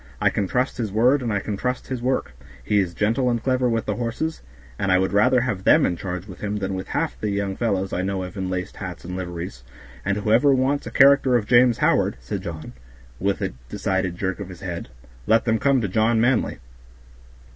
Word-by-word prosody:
I - - +3
can 100 - -1
trust 125 +5 -1
his 110 -4 -2
word 125 +7 +3
and 120 -3 -2
I 100 - +1
can 105 +1 -4
trust 125 +4 -3
his 130 -2 -3
work; 130 +2 -1 0.3
he 105 +10 +2
is 90 -3 -1
gentle 115 +5 +1
and 120 -2 -1
clever 130 -1 +1
with 115 -1 -1
the - - -2
horses, 125 +7 -3 0.4
and 100 - +1
I 90 - +5
would 95 +1 0
rather 125 +5 +4
have 105 -7 -2
them - - +5
in 90 - 0
charge 90 0 -5
with 95 -4 -11
him 105 0 -2
than 95 -1 -3
with 95 0 -4
half - - -2
the 105 - -1
young 100 -1 -2
fellows 100 -5 -1
I 90 - 0
know 95 0 -2
of 90 - -8
in 95 -2 -3
laced 90 0 -4
hats 90 -3 -7
and 90 +1 -5
liveries; 90 -1 -6 0.4
and 100 0 0
whoever 115 +7 +4
wants 135 +2 0
a - - -3
character 135 -2 +5
of 115 -4 +1
James 120 0 +5
Howard," - - +2
said 70 +11 -5
John, 80 -3 -7 0.5
with 100 +1 0
a - - -2 0.2
decided 95 -2 -1
jerk 95 +1 -2
of 100 -2 -6
his 90 -2 -11
head, 85 -7 -5 0.4
"let 115 +1 +4
them 110 -1 +2
come 140 -2 +3
to 105 - -1
John 110 +4 +2
Manly." 120 0 +1
105 Hz, 225 wpm, -23 LUFS, 95-125 Hz, 0.5 s, I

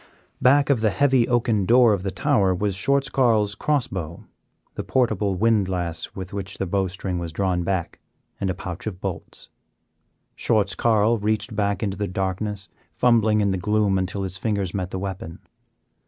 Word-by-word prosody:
Back 140 +2 +4
of 125 -5 +1
the 110 - +3
heavy 130 +2 +3
oaken 115 -5 +1
door 120 -1 +6
of 100 - -1
the 95 - -2
tower 100 -5 +1
was 100 +2 -1
Schwartz 140 +9 +1
Carl's 110 -7 +2
cross 145 +2 0
bow, 85 -3 -6 0.5
the - - -5
portable 110 -6 +1
windlass 95 -5 0
with 95 0 -7
which 100 -1 -5
the 95 - -2
bowstring 95 -1 -2
was 85 -1 -5
drawn 90 +1 0
back, 90 -1 -2 0.4
and 95 - -1
a 95 - -1
pouch 90 +1 -6
of 95 -4 -5
bolts. 95 -4 -6 0.9
Schwartz 100 -3 +1
Carl 115 0 +2
reached 110 +2 -1
back 100 0 0
into 100 -2 -2
the 105 0 -2
darkness, 95 +2 -3 0.2
fumbling 110 -3 +3
in 100 -1 +2
the 95 - -1
gloom 105 -1 +1
until 95 +2 -2
his 95 -1 -3
fingers 100 -5 -1
met 90 -2 -3
the 95 - -4
weapon. 95 -4 -5
100 Hz, 170 wpm, -23 LUFS, 95-110 Hz, 0.9 s, door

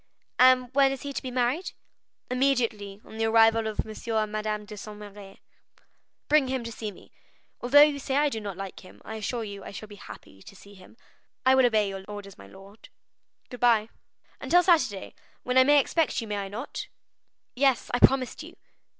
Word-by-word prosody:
"And 255 0 +5
when 275 0 +4
is 270 - -6
he 285 0 -5
to - - -4
be 260 - -6
married?" 260 +9 -1 0.6
"Immediately 235 -7 0
on 220 - -11
the 225 - +1
arrival 225 0 +4
of 215 - -2
M. 220 +1 -4
and 215 -1 -1
Madame 215 0 -3
de 210 - -10
Saint 210 +1 -9
Méran." 205 -1 -12 0.9
"Bring 295 -2 +3
him 260 -1 -2
to 230 - -6
see 220 -1 -5
me. 190 - -18 0.5
Although 285 +4 +7
you 295 -1 +1
say 270 0 -3
I 295 +1 +3
do 225 -5 -5
not 200 -3 -6
like 195 -1 -7
him, 185 - -16
I 220 - -6
assure 225 +2 -3
you 200 -2 -8
I - - -8
shall 200 +2 -8
be 205 -1 -13
happy 95 - -13
to 195 - -14
see 200 +1 -16
him." 190 +3 -17 0.5
"I 260 - +6
will 260 -1 +5
obey 215 -3 +1
your 195 -1 -6
orders, 205 -1 -9
my 100 - -14
lord." 195 - -16 0.6
"Good 250 - -8
bye." 230 -3 +3 0.5
"Until 355 +1 +3
Saturday, 255 - +1 0.3
when 250 +1 +3
I - - +8
may 290 +2 +5
expect 315 +2 0
you, 230 - -4
may 210 -1 -3
I 200 -1 -4
not?" 220 +8 -6 0.7
"Yes, 265 -1 +1
I 245 - +1
promised 260 -1 +3
you." - - -11
225 Hz, 200 wpm, -26 LUFS, 205-260 Hz, 0.9 s, I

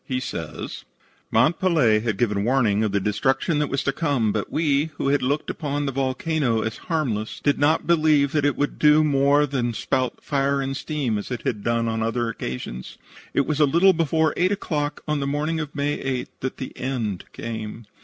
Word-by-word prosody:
He 130 -1 -2
says: 85 -10 -6 0.5
"Mont 135 +11 +3
Pelee 155 - +3
had 110 -2 -2
given 105 -3 +1
warning 115 -4 +2
of 105 - 0
the 100 - +1
destruction 130 - 0
that 150 - 0
was 135 - -1
to 140 - +1
come, 135 -7 0
but - - -3
we, 150 -2 +2
who 135 - -1
had 145 0 +2
looked 145 +4 -1
upon 145 -2 -3
the 135 - -1
volcano 130 -2 0
as 110 0 -3
harmless, 120 -10 -1
did 145 - +1
not 150 +3 +3
believe 155 -4 +3
that 150 -2 +1
it 145 -1 +2
would 145 - -2
do 150 +1 +6
more 145 0 +3
than 125 -4 -2
spout 130 +3 -1
fire 140 -1 +1
and 135 0 -2
steam, 135 -8 -2
as - - -7
it 125 -3 -4
had 105 -3 -2
done 115 0 +1
on 115 0 -1
other 115 +1 0
occasions. 65 - -6 0.4
It 140 - +3
was 150 -1 -1
a 150 - +6
little 175 +7 +5
before 160 -2 +1
eight 180 +2 +2
o'clock 150 -7 -2
on 150 -1 0
the 140 - -2
morning 150 +3 -1
of 150 -2 -5
May 145 +1 -1
8 130 -2 -3
that 130 - -4
the 130 - -7
end 115 -8 -3
came. 115 0 -6
135 Hz, 205 wpm, -23 LUFS, 115-150 Hz, 0.5 s, do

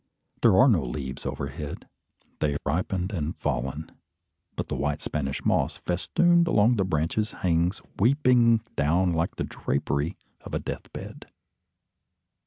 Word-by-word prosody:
There 110 -6 +5
are 130 - +7
no 95 - +4
leaves 65 +1 -5
overhead. 70 +2 -5 0.5
They 75 -1 +1
have 70 - -2
ripened 90 +5 -1
and 80 -3 -3
fallen; 70 +5 -3 0.6
but - - -3
the - - -3
white 75 0 -1
Spanish 70 -3 -3
moss, - - +1
festooned 170 - +2
along 115 -5 +4
the 100 - +2
branches, 95 +5 0
hangs 85 +1 +1 0.2
weeping 120 -1 +4
down 85 +5 +2
like 80 +1 -1
the - - -2
drapery 70 +5 -2 0.3
of - - -6
a - - 0
deathbed. - - -7
85 Hz, 135 wpm, -26 LUFS, 75-110 Hz, 0.6 s, are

